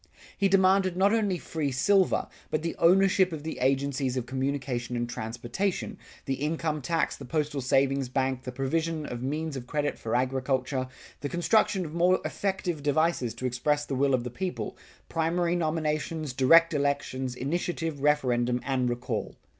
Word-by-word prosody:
He 200 - +2
demanded 190 -1 +4
not 200 +3 +4
only 205 -5 +1
free 155 -4 -3
silver, 190 +8 +2 0.2
but 155 - -1
the 165 - -2
ownership 190 +1 +4
of 155 -3 -6
the 160 - -5
agencies 135 0 0
of 125 - -2
communication 130 -2 -2
and 120 0 -1
transportation, 120 - -3 0.3
the 135 - -1
income 155 +2 -2
tax, 165 +5 0
the - - -10
postal 145 +1 -1
savings 135 +1 +2
bank, 130 0 0
the 125 - -6
provision 155 +4 -1
of 120 -3 -5
means 150 +3 -2
of 125 -2 -6
credit 145 +1 -1
for 110 - -2
agriculture, 130 +1 0 0.3
the 145 - -4
construction 185 +2 +2
of 155 - -7
more 180 +2 +3
effective 185 -5 -2
devices 145 -5 +1
to 125 - -5
express 145 +4 0
the - - -4
will 135 0 +3
of 120 - -2
the 125 - -5
people, 185 +7 -4 0.3
primary 170 +1 0
nominations, 155 -2 -1
direct 165 +6 +6
elections, 140 -3 -1
initiative, 160 +2 -2
referendum 125 -4 +2
and 130 -2 +1
recall. 120 +1 -3
145 Hz, 160 wpm, -28 LUFS, 130-165 Hz, 0.3 s, direct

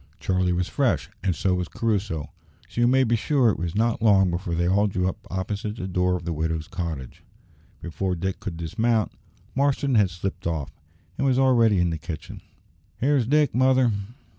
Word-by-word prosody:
Charlie 90 -1 +1
was 90 0 0
fresh, 90 - 0
and 95 -4 +1
so 95 - +1
was 90 -1 -1
Crusoe, 105 - -2 0.4
so 120 - -3
you 120 - +5
may 130 +2 +4
be 120 -1 +2
sure 125 +1 +2
it - - -4
was 85 +1 -3
not 115 +1 +1
long 95 -5 +4
before 85 0 -2
they 85 +1 +1
all 100 +3 +3
drew 90 -2 0
up 105 +3 -6
opposite 100 +3 -3
the 95 -4 -5
door 90 0 +1
of 85 -2 -5
the 85 - -2
widow's 80 0 -2
cottage. 80 -8 -5 0.6
Before 90 +2 -2
Dick 95 +2 -3
could 90 -5 -6
dismount, 110 +7 0 0.4
Marston 140 0 +1
had 105 -5 +4
slipped 90 0 -4
off, 75 -4 -3 0.5
and 140 - +2
was 130 -1 +3
already 120 -6 +4
in 90 -1 +2
the 80 - -3
kitchen. 80 0 -7 0.6
"Here's 135 -2 +2
Dick, 150 0 +3
mother!" 130 -1 +4
95 Hz, 190 wpm, -25 LUFS, 85-115 Hz, 0.6 s, you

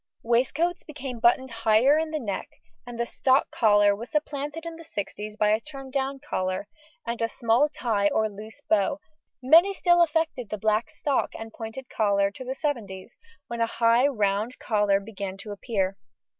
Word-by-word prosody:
Waistcoats 265 +9 +1
became 275 -5 -7
buttoned 245 +2 +3
higher 230 +6 +4
in 320 0 -2
the 310 - -2
neck, 210 -9 -4 0.4
and 240 -1 -7
the 235 - +1
stock 260 +3 +2
collar 205 -2 +4
was 235 +4 -8
supplanted 295 +1 -3
in 335 -1 -6
the 330 - -11
sixties 210 -5 -6
by 210 -1 +3
a 215 +1 +3
turn 270 0 -9
down 275 0 -1
collar, 185 +2 -2 0.4
and 235 -1 -3
small 235 +5 +2
tie 220 -8 0
or 220 +2 +1
loose 215 +1 -11
bow; 215 +7 +2 0.4
many 335 +9 +6
still 350 -2 +4
affected 315 -8 0
the 215 - -3
black 215 +2 +1
stock 280 -3 -1
and 225 0 -8
pointed 230 +3 -7
collar 200 -3 +1
to 230 - -9
the 260 +1 -4
seventies, 230 -9 -4 0.3
when 235 0 -5
a 230 - +3
high 235 +3 +4
round 215 -2 0
collar 205 -3 +2
began 200 -2 -6
to 205 +2 -8
appear. 195 -2 -2
235 Hz, 170 wpm, -26 LUFS, 210-275 Hz, 0.4 s, many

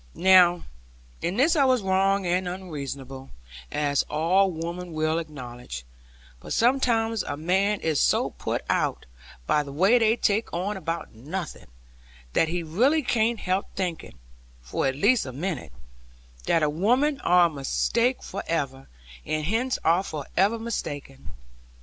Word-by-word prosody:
Now 180 -2 +5 0.6
in 180 +4 -2
this 315 +7 +4
I 290 - +4
was 255 -4 +2
wrong 195 +1 +2
and 180 +1 0
unreasonable 140 -7 -6 0.4
(as 145 -1 +1
all 180 +6 +3
women 170 +1 -5
will 155 +1 0
acknowledge); 125 - -8 0.5
but - - -6
sometimes 230 -3 +2
a 145 - -5
man 190 +6 +1
is 160 -3 0
so - - +2
put - - -4
out, - - 0 0.4
by 150 - +2
the 140 -1 -8
way 190 - +4
they 225 0 +3
take 215 +1 0
on 190 +5 -2
about 165 -2 -4
nothing, 155 - -6 0.7
that 165 - +3
he 175 +1 -2
really 250 - +2
cannot 230 -1 +1
help 185 +1 -2
thinking, 175 - -4 0.5
for - - -1
at 135 - -1
least 205 - +3
a - - -5
minute, 140 - -4 0.8
that 160 -2 +3
women 255 - +2
are 180 0 +5
a 165 - -1
mistake 230 - 0
for - - -5
ever, 135 -5 -3 0.3
and 155 -1 -2
hence 235 +8 0
are 170 +3 +4
for 155 -7 -6
ever 200 +5 +3
mistaken. 145 - -6
175 Hz, 145 wpm, -25 LUFS, 150-210 Hz, 0.8 s, Now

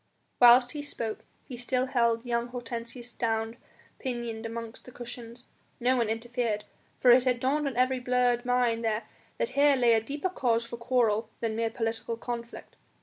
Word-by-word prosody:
Whilst 245 +1 +7
he 295 - -5
spoke 230 -6 -4 0.2
he 255 - -7
still 250 +1 0
held 235 -2 +1
young 235 0 0
Hortensius 240 0 -6
down 225 0 -1 0.4
pinioned 235 -3 -4
amongst 230 0 -7
the 250 - -11
cushions. 240 0 -9 0.3
No 250 +1 +3
one 230 -3 +1
interfered, 225 -1 -2 0.3
for 250 - +6
it 245 +1 +7
had 250 -2 +2
dawned 280 +4 +1
on 260 -3 -4
every 255 +1 +2
blurred 245 -1 +2
mind 245 -2 +1
there 220 0 0 0.3
that - - 0
here 285 0 +4
lay 240 -3 +4
a 225 - +3
deeper 290 +10 -3
cause 235 -9 0
for 235 0 -7
quarrel 235 -3 +1
than 225 -2 -2
mere 225 0 0
political 225 0 -3
conflict. 235 0 -7
240 Hz, 170 wpm, -28 LUFS, 230-250 Hz, 0.4 s, Whilst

